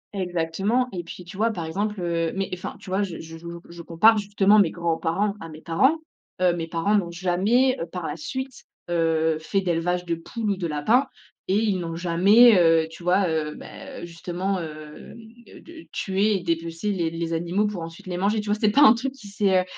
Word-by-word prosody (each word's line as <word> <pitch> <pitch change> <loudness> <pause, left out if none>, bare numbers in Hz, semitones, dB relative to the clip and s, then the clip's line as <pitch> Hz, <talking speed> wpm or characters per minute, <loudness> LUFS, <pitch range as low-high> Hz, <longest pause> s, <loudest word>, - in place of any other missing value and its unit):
Exactement 190 +7 0
et 175 -2 -5
puis 175 +2 -10
tu 175 +2 -11
vois, 225 +3 +2
par 175 -6 -5
exemple, 205 +5 -3
heu, 170 -1 -1
mais 195 0 -1
enfin 180 - -5
tu 185 - -10
vois, 190 +2 +1
je 185 -5 -3
je 165 0 -9
jou 170 +1 -9
je 170 0 -10
compare 215 +7 +4
justement 205 0 +3
mes 195 -5 +4
grands-parents 170 +4 -1
à 165 - -8
mes 155 - -10
parents, 260 - +2 0.4
heu, 180 -1 +3
mes 165 -1 -4
parents 165 +5 0
n'ont 190 -4 +1
jamais 190 +9 +2 0.2
par 180 -2 -5
la - - -3
suite, 260 -3 -6 0.3
heu, 160 -1 +1
fait 195 +5 -1
d'élevage 180 0 -1
de 170 - -1
poules 210 +6 -3
ou - - 0
de 175 -3 -2
lapins 215 - +2 0.4
et 190 - +1
ils 210 -4 +1
n'ont 165 -1 -4
jamais, 195 +7 +6
heu, 165 -1 +4
tu 165 - -12
vois, 180 +2 +2
heu, 155 -2 -2
beh, 275 -10 -9
justement, 175 +3 -3
hem, 155 -2 -9
de 230 0 -15
de 330 0 -13
tuer 200 +2 +1
et 185 - -3
dépecer 165 +3 -2
les 175 -4 -1
les 165 0 -4
animaux 175 +5 0
pour 205 -5 -3
ensuite 165 0 -9
les 180 -1 -4
manger 205 +4 +1
tu 210 0 -5
vois? - - +3
C'est 215 - +3
pas 255 +8 +3
un 220 - +9
truc 260 +3 -3
qui 210 -7 -13
s'est, 195 -2 +2
heu, - - -3
180 Hz, 215 wpm, -24 LUFS, 165-210 Hz, 0.4 s, un